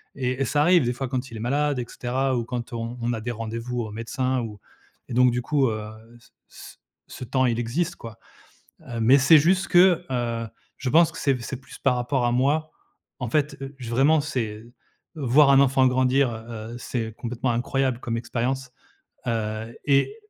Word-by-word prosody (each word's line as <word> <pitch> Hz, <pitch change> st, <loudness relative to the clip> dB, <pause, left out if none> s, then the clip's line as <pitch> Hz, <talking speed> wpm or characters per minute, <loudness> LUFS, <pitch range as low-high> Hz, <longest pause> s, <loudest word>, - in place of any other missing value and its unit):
et 130 Hz, 0 st, -2 dB
et -, -, +2 dB
ça 145 Hz, +2 st, +1 dB
arrive 175 Hz, -2 st, +5 dB
des 120 Hz, -, 0 dB
fois 135 Hz, +2 st, -4 dB
quand 130 Hz, +1 st, -3 dB
il 115 Hz, -, -7 dB
est -, -, -7 dB
malade 140 Hz, +4 st, 0 dB
et 120 Hz, -, -3 dB
cetera 130 Hz, +2 st, -1 dB
ou 115 Hz, -, -2 dB
quand 120 Hz, 0 st, -5 dB
on 115 Hz, +1 st, -4 dB
on 120 Hz, +1 st, 0 dB
a 110 Hz, -, -4 dB
des 120 Hz, +2 st, -3 dB
rendez-vous 115 Hz, +2 st, -4 dB
au 110 Hz, -, -5 dB
médecin 130 Hz, +4 st, -2 dB
ou 105 Hz, -3 st, -7 dB, 0.5 s
et -, -, -5 dB
donc 125 Hz, 0 st, +5 dB
du 125 Hz, -, -1 dB
coup, 135 Hz, 0 st, +1 dB
heu, 110 Hz, -1 st, -4 dB, 0.3 s
c -, -, -23 dB, 0.2 s
c -, -, -13 dB, 0.3 s
ce -, -, -8 dB
temps, 130 Hz, +1 st, +1 dB
il 120 Hz, -2 st, +1 dB
existe 165 Hz, +9 st, -1 dB
quoi. 115 Hz, -7 st, -10 dB, 0.6 s
Heu, 120 Hz, -1 st, -6 dB
mais 125 Hz, +5 st, +6 dB
c'est 145 Hz, +4 st, +7 dB
juste 185 Hz, +6 st, +3 dB
que, 180 Hz, -1 st, +5 dB
heu, 115 Hz, -2 st, -2 dB, 0.3 s
je 135 Hz, -, -3 dB
pense 165 Hz, +3 st, +5 dB
que 160 Hz, -, -10 dB
c'est 140 Hz, -, +2 dB
v 125 Hz, -, -5 dB
c'est 135 Hz, -, -5 dB
plus -, -, -13 dB
par 125 Hz, -, +2 dB
rapport 125 Hz, +1 st, 0 dB
à 120 Hz, -, +2 dB
moi, 145 Hz, +5 st, +1 dB, 0.5 s
en 125 Hz, -3 st, -3 dB
fait, 150 Hz, +3 st, 0 dB
heu, 135 Hz, +1 st, -7 dB
j 120 Hz, -3 st, -7 dB
vraiment, 140 Hz, +6 st, +3 dB
c'est 115 Hz, -7 st, -4 dB, 0.5 s
voir 140 Hz, 0 st, +4 dB
un 135 Hz, -, +6 dB
enfant 135 Hz, -1 st, +4 dB
grandir, 130 Hz, 0 st, +2 dB
heu 110 Hz, 0 st, -8 dB
heu, -, -, -6 dB
c'est 115 Hz, -2 st, -4 dB
complètement 125 Hz, +1 st, -2 dB
incroyable 125 Hz, +1 st, 0 dB
comme 115 Hz, -2 st, -3 dB
expérience, 125 Hz, +2 st, -3 dB, 0.6 s
heu, 110 Hz, 0 st, -3 dB
et 140 Hz, -, +2 dB
125 Hz, 205 wpm, -24 LUFS, 115-140 Hz, 0.6 s, c'est